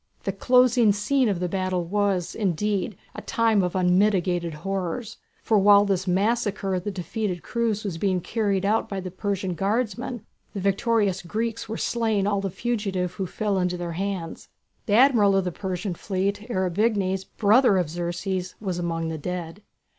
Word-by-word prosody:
The 195 - -1
closing 245 +2 +4
scene 240 +5 +1
of 190 -4 -1
the 180 - -1
battle 185 -1 -1
was, 195 -1 0
indeed, 200 0 -1 0.2
a - - -7
time 225 -3 +2
of 180 -1 -2
unmitigated 180 -2 +2
horrors, 195 +6 -4 0.3
for 215 -2 +3
while 200 +1 +6
this 190 -1 -1
massacre 200 +1 0
of 180 -1 -2
the - - -1
defeated 190 0 -3
crews 230 -3 -1
was 185 -6 -4
being 190 -1 +1
carried 200 0 -1
out 215 +2 +1
by 195 - -3
the 185 -1 -6
Persian 190 -1 -2
guardsmen, 215 +5 -2 0.3
the - - -2
victorious 200 0 +1
Greeks 225 +5 -3
were 220 - -3
slaying 220 -4 0
all 200 -1 +1
the 195 - -2
fugitives 195 -4 -2
who 190 -1 -3
fell 205 +1 -1
into 180 0 0
their 175 -1 -4
hands. 185 -1 -4 0.4
The 205 - +1
Admiral 225 -5 +5
of 195 - +2
the 180 - -2
Persian 185 +1 -4
fleet, 200 +4 -2
Ariabignes, 190 -1 0
brother 215 +2 +3
of 180 -3 +1
Xerxes, 175 +3 -3
was 185 -4 -3
among 165 -1 -2
the 160 -1 -4
dead. 180 +3 -5
195 Hz, 170 wpm, -25 LUFS, 180-215 Hz, 0.4 s, while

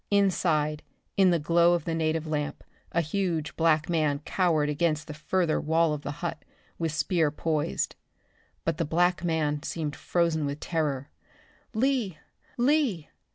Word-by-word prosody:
Inside, 165 -7 +2 0.3
in 190 -2 +5
the 175 - +3
glow 170 +3 +4
of 170 - -3
the 165 - -1
native 160 0 0
lamp, 150 -2 -3 0.3
a 170 - +2
huge 165 -2 -2
black 160 -2 +3
man 155 -4 +1
cowered 165 -6 +2
against 155 +1 0
the 155 - -7
further 160 +2 0
wall 160 0 +2
of 150 - -4
the 145 - -5 0.2
hut, 165 - -4 0.4
with 165 -2 0
spear 160 +1 +1
poised. 150 0 -1 0.7
But 165 -2 0
the 165 - +1
black 175 +3 +2
man 155 -3 0
seemed 155 -2 -3
frozen 165 -4 0
with 140 +1 -4
terror. 145 -5 -2 0.6
"Lee! 235 - +1 0.4
Lee!" 245 - +2
160 Hz, 150 wpm, -27 LUFS, 150-175 Hz, 0.7 s, in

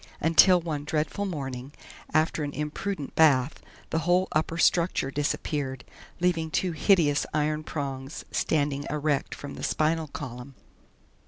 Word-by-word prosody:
Until 170 +3 +6
one 155 -4 -4
dreadful 155 +6 -1
morning, 135 -6 -5 0.4
after 155 0 +1
an 145 -1 -4
imprudent 150 +1 -4
bath, 140 -3 +3 0.3
the 160 - +1
whole 180 +3 +2
upper 160 +2 0
structure 170 -5 +2
disappeared, 140 -2 -2 0.4
leaving 170 -2 +1
two 180 +3 0
hideous 160 -3 +3
iron 155 0 0
prongs 135 -2 -5
standing 145 -2 0
erect 150 -1 -1
from 145 -1 -8
the - - -8
spinal 160 +1 +1
column. 130 -1 -8
150 Hz, 130 wpm, -27 LUFS, 140-165 Hz, 0.4 s, Until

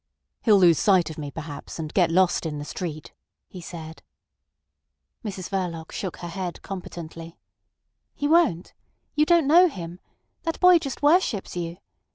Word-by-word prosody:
"He'll 215 -4 +5
lose 175 -4 +5
sight 185 -5 +3
of 155 - -9
me 145 -1 -5
perhaps, 145 -1 -8
and 155 -1 -5
get 175 -4 +3
lost 175 -1 +2
in 150 -2 -4
the 145 - -6
street," 155 -1 -6 0.3
he 180 - -10
said. 160 -2 -9 1.2
Mrs 190 -4 -5
Verloc 175 -4 -3
shook 190 -4 -5
her - - -4
head 175 0 -5
competently. 170 -3 -8 0.8
"He 290 - -1
won't. 300 - +2 0.4
You 300 0 +2
don't 340 -3 +4
know 345 +6 +7
him. 175 - -7 0.4
That 330 -1 -3
boy 360 -1 +7
just 275 -2 -6
worships 290 - +2
you. 170 -1 -4
180 Hz, 155 wpm, -25 LUFS, 165-255 Hz, 1.2 s, know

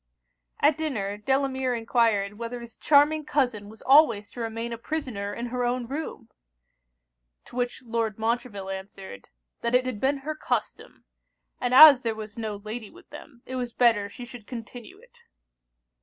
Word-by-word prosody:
At 295 +1 +3
dinner, 215 -11 -2
Delamere 265 +2 0
enquired 225 -3 +1
'whether 235 +1 -5
his 235 0 -11
charming 300 +1 +4
cousin 245 -9 -1
was 220 0 -14
always 235 -8 +5
to - - -10
remain 230 +1 -4
a - - -5
prisoner 230 -7 -4
in 235 +3 -5
her 250 0 -1
own 245 0 -1
room?' 275 -2 -6 1.2
To - - -15
which 245 +1 -2
Lord 225 -3 -2
Montreville 220 -3 -2
answered, 190 - -9 0.3
'that 235 +1 0
it 255 0 +3
had 250 -5 -4
been 275 +2 +2
her 310 - -2
custom; 310 - -4 0.5
and 245 - -1
as 280 0 +10
there 230 -2 -2
was 215 -1 -8
no 220 -3 -4
lady 215 +2 -7
with - - -18
them, 290 -4 -13
it 260 - -5
was 245 -2 -4
better 225 -5 +3
she 245 +4 -9
should 240 -3 -12
continue 245 - -9
it.' 485 +2 -22
240 Hz, 165 wpm, -26 LUFS, 220-265 Hz, 1.2 s, as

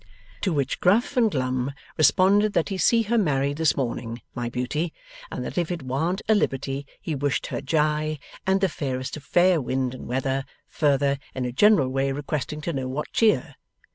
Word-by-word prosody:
To 195 - +1
which 140 -4 -1
Gruff 215 +9 +3
and 235 -3 +4
Glum 130 -3 -1 0.2
responded 200 +6 +4
that 170 - +1
he 195 - -2
see 230 +6 +4
her 230 +2 +1
married 140 -5 +1
this 160 -3 +2
morning, 120 -3 -3
my 120 -1 -3
Beauty, 130 +7 -2 0.4
and - - -5
that - - -2
if 170 - -1
it 175 -5 -4
warn't 160 +9 -1
a 220 - +5
liberty 135 -7 -1
he 160 - -4
wished 145 -1 -1
her - - -2
ji 150 +1 0 0.3
and 190 0 +3
the 195 - +4
fairest 130 -6 -4
of 150 - -11
fair 175 -1 +3
wind 130 0 -1
and 130 - -9
weather; 135 +2 -1 0.2
further, 140 -2 +1 0.2
in 130 -1 -2
a 125 - -2
general 160 - +4
way 135 +1 0
requesting 145 +2 -3
to 170 +2 -3
know 135 -2 -2
what 135 +4 -4
cheer? 225 -2 +2
145 Hz, 190 wpm, -25 LUFS, 135-175 Hz, 0.4 s, a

